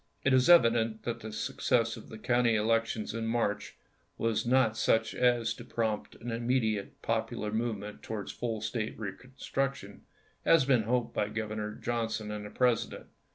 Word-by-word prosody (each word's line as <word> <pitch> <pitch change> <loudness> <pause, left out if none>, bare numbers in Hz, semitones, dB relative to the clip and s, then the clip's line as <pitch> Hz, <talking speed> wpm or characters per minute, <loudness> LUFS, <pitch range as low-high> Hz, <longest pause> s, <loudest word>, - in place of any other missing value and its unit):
It 135 - +3
is 130 +4 +4
evident 115 -8 +5
that 120 -1 -3
the 110 -1 -7
success 115 0 0
of - - -12
the 110 - -8
county 120 0 +2
1864. 105 - 0
elections 115 -1 0
in 115 -1 -2
March 105 -3 -1 0.4
was 115 +1 0
not 125 -3 +4
such 110 0 +2
as 120 -2 +2
to - - -10
prompt 110 -2 -2
an 120 0 -6
immediate 115 -3 -1
popular 105 - -1
movement 110 -2 -3
towards 105 -3 -5
full 115 -3 -3
State 110 0 -3
reconstruction 125 +1 -4 0.4
as 165 -4 +5
had - - -6
been 125 -5 +4
hoped 120 +1 0
by 105 -1 0
Governor 105 -1 -3
Johnson 115 -2 -2
and 105 -1 -5
the - - -9
President. 125 +1 0
115 Hz, 165 wpm, -30 LUFS, 110-120 Hz, 0.4 s, evident